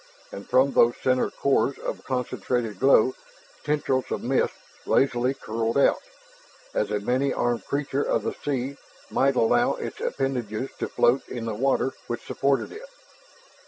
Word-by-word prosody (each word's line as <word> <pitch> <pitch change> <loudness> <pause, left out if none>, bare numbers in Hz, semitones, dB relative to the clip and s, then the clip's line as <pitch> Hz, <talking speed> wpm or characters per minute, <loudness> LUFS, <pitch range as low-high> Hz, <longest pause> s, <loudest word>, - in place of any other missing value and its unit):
And 100 - -9
from 130 +2 +4
those 120 +1 +5
center 130 -1 +2
cores 135 -1 +1
of - - -5
concentrated 125 -4 -2
glow, 130 -2 +5 0.5
tendrils 145 -3 0
of - - -3
mist - - +1 0.3
lazily 130 0 +2
curled 115 0 -2
out, 140 - +4 0.7
as 105 - 0
a 105 0 0
many 130 +6 0
armed 120 -4 -1
creature 140 -1 -1
of - - 0
the - - -2
sea 135 -1 -3 0.3
might 135 0 +2
allow 115 -2 +3
its - - -6
appendages 130 -3 -2
to - - -2
float 125 +3 +2
in 120 -2 -5
the 115 - -2
water 135 +3 +1
which 120 - -4
supported 135 0 0
it. 480 +4 -10
130 Hz, 150 wpm, -25 LUFS, 115-135 Hz, 0.7 s, those